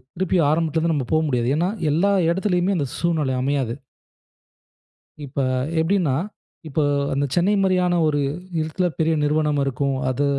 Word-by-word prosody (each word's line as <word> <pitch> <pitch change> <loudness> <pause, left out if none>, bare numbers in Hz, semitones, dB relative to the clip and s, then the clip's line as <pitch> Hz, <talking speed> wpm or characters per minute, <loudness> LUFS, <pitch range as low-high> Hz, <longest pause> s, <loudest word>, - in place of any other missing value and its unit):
திருப்பியும் 180 -3 +1
ஆரம்பத்தில 160 0 0
இருந்து 165 -1 +1
நாம 135 -5 -2
போக 155 - +3
முடியாது. 125 -2 0
ஏன்னா, 170 +4 +1 0.2
எல்லா 185 +7 +2 0.2
இடத்திலேயுமே 190 +1 +1
அந்த 140 -3 -1
சூழ்நிலை 155 -6 0
அமையாது. 135 -4 -1 1.5
இப்ப 140 +1 -6 0.4
எப்படின்னா, 165 -5 +1 0.5
இப்போ 150 +1 0 0.3
அந்த 140 +1 0
சென்னை 185 +4 +3
மாதிரியான 180 -2 +2
ஒரு 145 -1 +1 0.4
இடத்தில 170 +4 -1
பெரிய 160 0 +2
நிறுவனம் 150 -1 +1
இருக்கும். 135 +1 -1
அது 135 +3 0
155 Hz, 140 wpm, -22 LUFS, 140-175 Hz, 1.5 s, போக